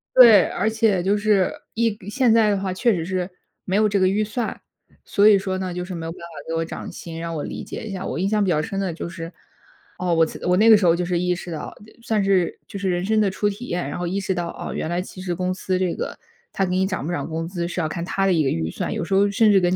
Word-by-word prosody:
对， 235 -5 +9
而 220 - 0
且 220 -4 +2
就 200 +3 +2
是 205 -3 +2 0.2
一 225 -2 0
现 245 -1 +3
在 220 -2 +5
的 200 - +2
话， 190 -1 -2
确 230 +4 +2
实 165 -2 -2
是 185 0 -2 0.3
没 190 - -2
有 215 0 +4
这 200 -1 +1
个 185 - +4
预 205 +3 +1
算。 225 +2 -3 0.5
所 205 +1 +4
以 205 -2 +7
说 190 -1 -2
呢， 185 -2 -3
就 180 0 -4
是 185 -1 -6
没 165 -1 -5
有 165 - -4
办 - - -11
法 170 - -8 0.2
给 165 - -3
我 165 0 0
涨 - - -7
薪， 165 -1 -8
让 165 0 -4
我 150 - -3
理 - - -5
解 - - -7
一 205 - -5
下。 190 0 -5
我 135 - -3
印 190 - +1
象 210 -1 +2
比 190 - 0
较 155 -2 +2
深 195 +5 -4
的 185 -4 -1
就 170 - -5
是， 165 -1 -7 0.7
哦， 180 -1 0
我 165 0 +4
辞 - - -8
我 180 0 +3
那 225 +2 +5
个 220 - +10
时 195 - 0
候 170 0 +5
就 180 0 -1
是 175 -1 0
意 180 +1 +1
识 175 0 -7
到， 155 - -6
呃， 210 - -16 0.2
算 215 -4 +1
是 190 -3 +1
就 200 - -7
是 195 -1 -1
人 175 0 0
生 215 +1 +2
的 195 -2 +2
初 205 +2 0
体 215 +5 -7
验， 175 - -3
然 - - -4
后 175 - -3
意 190 +3 -1
识 190 -1 -1
到， 170 -1 -2
哦， - - -6
原 160 - -3
来 175 +1 0
其 185 0 -9
实 180 -2 -2
公 185 +1 -1
司 185 0 -2
这 185 -2 0
个 - - -5 0.3
它 195 - 0
给 180 - -3
你 190 0 +2
涨 190 -7 -3
不 - - -2
涨 - - -2
工 165 +1 -3
资， 175 -1 -3
是 175 - -4
要 155 - 0
看 170 +2 -4
它 195 +2 0
的 190 - +3
一 160 -2 +3
个 135 - +1
预 80 0 -1
算， - - -3
有 - - -2
时 180 - -3
候 200 +1 +4
甚 215 +1 +4
至 195 - +6
跟 180 +1 +2
185 Hz, 330 characters per minute, -22 LUFS, 175-205 Hz, 0.7 s, 个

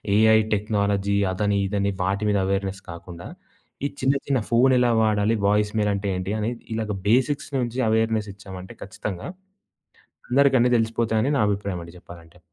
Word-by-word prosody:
AI 110 +1 +6 0.2
technology 100 -1 0 0.2
అదని 100 +2 0
ఇదని 100 0 0
వాటి 100 +3 -1
మీద 100 - +2
ఎవేర్‌నెస్ 95 0 -2
కాకుండా, 85 0 -10 0.6
ఈ - - +3
చిన్న 135 +2 +2
చిన్న 135 -2 +2
ఫోనెలా 125 0 +4
వాడాలి 110 +1 +2
వాయిస్ 105 0 +2
మెయిల్ 105 -1 +2
అంటే 100 0 -3
ఏంటి 95 +3 -3
అని 110 +2 -1 0.2
ఇలాగ 110 -1 -2 0.2
బేసిక్స్ 130 +6 +1
నుంచి 120 0 -2
ఎవేర్‌నెస్ 110 -1 +1
ఇచ్చామంటే 95 -2 -10
ఖచ్చితంగా, 95 -1 -6 1.0
అందరికి 135 +1 +4
అన్ని 125 +1 +3
తెలిసిపోతాయి 115 -1 0
అని 145 - +1
నా - - +2
అభిప్రాయం 100 -3 -3
అండి 85 +1 -13
చెప్పాలంటే. 85 0 -14
105 Hz, 155 wpm, -24 LUFS, 100-115 Hz, 1.0 s, AI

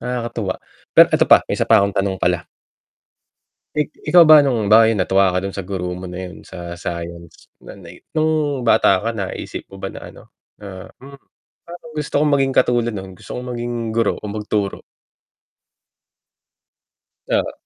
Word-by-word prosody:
nakakatuwa. 120 -5 -3 0.4
Pero - - +9
eto - - +3
pa, - - +7
may - - +1
isa - - 0
pa 110 -3 +6
akong 100 -1 -1
tanong 95 -1 -1
pala. 90 -1 -1 1.3
Ik 150 0 0 0.2
ikaw 175 -3 +6
ba 155 -2 +8
nung 120 -7 0
bakit 110 -1 +5
natuwa 95 0 +2
ka 90 - 0
dun 95 +1 -6
sa 100 - -4
guro 90 -2 -4
mo 90 - -9
na 90 0 -7
'yun - - -13
sa 85 0 -8
science 85 -1 -8 0.2
na - - -10
ni - - -14
nung 155 -5 0
bata 95 -4 +4
ka 115 +2 -3
naisip 100 -3 -5
mo 95 - -11
ba 95 - -4
na - - -10
ano - - -15 0.4
na, 95 -2 -10
"Hmm, 140 +1 -12 0.5
parang 170 -2 -12
gusto 150 -1 -1
kong 150 -1 +2
maging 135 -1 +1
katulad 120 -2 +2
nun, 95 -2 -8
gusto - - -13
kong 125 0 -6
maging 120 -2 -4
guro 115 - 0
o 105 - -7
magturo." 105 -1 -3 2.5
Oo. - - 0
105 Hz, 170 wpm, -19 LUFS, 95-125 Hz, 2.5 s, Pero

